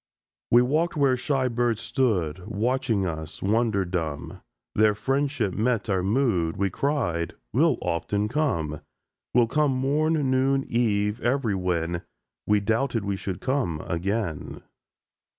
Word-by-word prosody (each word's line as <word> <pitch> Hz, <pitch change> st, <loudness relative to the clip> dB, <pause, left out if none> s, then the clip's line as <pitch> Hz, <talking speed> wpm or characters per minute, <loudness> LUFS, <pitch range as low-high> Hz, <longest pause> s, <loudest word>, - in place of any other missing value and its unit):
We 120 Hz, +1 st, +6 dB
walked 155 Hz, +6 st, 0 dB
where 140 Hz, -3 st, +4 dB
shy 130 Hz, +1 st, 0 dB
birds 120 Hz, -2 st, 0 dB
stood 95 Hz, -, -1 dB
Watching 115 Hz, -1 st, 0 dB
us, 80 Hz, -1 st, -5 dB
wonder 105 Hz, -1 st, +2 dB
dumb; 80 Hz, -5 st, -4 dB, 0.3 s
Their 105 Hz, 0 st, +4 dB
friendship 135 Hz, -2 st, 0 dB
met 110 Hz, -2 st, 0 dB
our 95 Hz, -1 st, +2 dB
mood; 95 Hz, -6 st, +1 dB
We 100 Hz, -1 st, 0 dB
cried: 90 Hz, -, -1 dB, 0.2 s
"We'll -, -, +3 dB
often 100 Hz, +5 st, -1 dB
come: 95 Hz, -, -1 dB, 0.5 s
We'll 120 Hz, -1 st, +6 dB
come 150 Hz, +5 st, +1 dB
morn, 145 Hz, +5 st, +1 dB, 0.2 s
noon, 135 Hz, +1 st, +2 dB
eve, 105 Hz, -2 st, +1 dB
everywhen!" 90 Hz, -9 st, 0 dB, 0.5 s
—We 105 Hz, 0 st, +4 dB
doubted 115 Hz, +1 st, 0 dB
we 100 Hz, -1 st, -1 dB
should 95 Hz, -1 st, -5 dB
come 130 Hz, -, 0 dB
again. 95 Hz, -1 st, -3 dB
110 Hz, 125 wpm, -26 LUFS, 95-130 Hz, 0.5 s, We